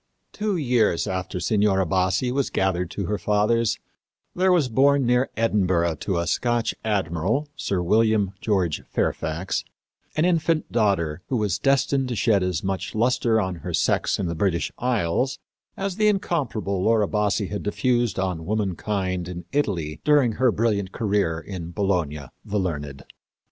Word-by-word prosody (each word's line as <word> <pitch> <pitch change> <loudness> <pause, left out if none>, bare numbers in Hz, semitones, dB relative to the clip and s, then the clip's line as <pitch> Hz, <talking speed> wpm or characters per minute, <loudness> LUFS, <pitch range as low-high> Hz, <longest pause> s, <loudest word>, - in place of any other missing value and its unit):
Two 210 -3 -1
years 120 - +2
after 95 -2 -3
Signora 100 -2 +2
Bassi 95 +7 +1
was 135 +1 0
gathered 90 -2 0
to 100 - -4
her 105 +2 -2
fathers 105 +4 +1 0.6
there 185 +1 +2
was 170 -7 +3
born 135 +3 +3
near 125 +2 +2
Edinburgh 95 -7 +1
to 95 +4 -2
a 85 - 0
Scotch 120 +7 0
admiral, 105 - 0
Sir 100 -10 -1
William 110 0 +2
George 95 -7 0
Fairfax, 80 +4 -1 0.5
an 155 - +2
infant 165 -2 +1
daughter 95 -8 +1
who 130 - 0
was 105 -6 0
destined 135 -1 +2
to 120 - -2
shed 105 -3 +2
as 90 -4 -1
much 95 0 -3
luster 115 0 +2
on 95 -4 -2
her - - -3
sex - - +1
in 100 - -2
the 85 - -2
British 85 0 0
Isles 125 +2 0 0.4
as 195 -1 -3
the 215 -1 +3
incomparable 140 - 0
Laura 110 0 +3
Bassi 105 0 0
had 105 - -4
diffused 120 +1 0
on 90 -4 -2
womankind 95 -3 -1
in 90 -1 -7
Italy 85 - -1
during 145 -5 +4
her 125 +2 +2
brilliant 105 -4 0
career 100 -8 0
in 85 -1 -7
"Bologna, 85 -6 -1 0.2
the 105 - -3
learned." 75 -7 -4
105 Hz, 155 wpm, -24 LUFS, 90-125 Hz, 0.6 s, during